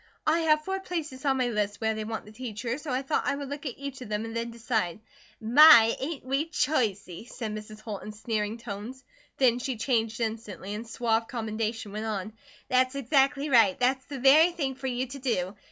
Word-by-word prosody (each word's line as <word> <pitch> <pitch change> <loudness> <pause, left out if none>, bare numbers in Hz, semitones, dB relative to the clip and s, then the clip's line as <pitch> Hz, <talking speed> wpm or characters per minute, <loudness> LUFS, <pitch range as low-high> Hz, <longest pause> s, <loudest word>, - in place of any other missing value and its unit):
"I 320 +2 +3
have 305 -2 +3
four 385 0 -2
places 320 -8 -5
on 270 -1 +2
my 250 -2 +1
list 205 -2 -1
where 220 -1 0
they 215 0 -4
want 220 0 -5
the 210 - -13
teacher, 230 +2 -5
so 305 - -8
I 260 +1 -1
thought 280 +3 -1
I 285 - +1
would 280 -1 -6
look 285 +1 -5
at 250 - -6
each 280 -1 -7
of 245 - -8
them 210 +1 -2
and 225 0 -7
then 230 0 -2
decide." 225 -6 -2 0.4
"My, 235 -1 +8
ain't 285 0 -5
we 275 +4 0
choicey!" 225 - -1
said 220 -4 -5
Mrs. 215 0 -8
Holt 215 -3 -6
in 215 - -7
sneering 215 0 -3
tones. 230 +4 -7 0.3
Then 250 -2 +3
she 250 -1 -3
changed 225 -1 0
instantly, 220 -3 -4
and 215 +3 -5
in - - -15
suave 225 -1 0
commendation 220 -2 -3
went 215 +2 -4
on: 210 -1 -4 0.3
"That's 255 +1 +2
exactly 275 +2 +2
right. 225 -7 +5
That's 260 +1 +1
the 280 - -7
very 290 +7 +6
thing 280 -6 -2
fer 265 +1 -6
you 250 0 -1
to 270 +2 -9
do. 210 -7 -1
240 Hz, 215 wpm, -28 LUFS, 220-270 Hz, 0.4 s, My